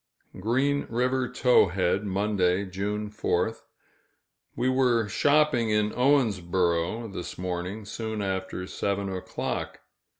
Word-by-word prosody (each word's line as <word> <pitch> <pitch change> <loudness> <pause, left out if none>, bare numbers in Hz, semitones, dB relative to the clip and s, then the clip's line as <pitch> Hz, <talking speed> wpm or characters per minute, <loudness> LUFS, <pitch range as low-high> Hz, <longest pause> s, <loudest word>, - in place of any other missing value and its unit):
Green 135 +8 +1
River 125 +2 0
Towhead, 95 -5 +3
Monday, 100 -1 +1
June 105 +3 -3
4th. 110 0 -1 0.9
We 120 +2 0
were 125 -4 +2
shopping 145 0 +3
in 105 0 +2
Owensboro, 100 -6 +1
this 90 - -6
morning, 90 +3 -4
soon 110 0 -4
after 95 -1 -3
seven 100 +1 -2
o'clock. 90 - -4
105 Hz, 100 wpm, -27 LUFS, 95-120 Hz, 0.9 s, Towhead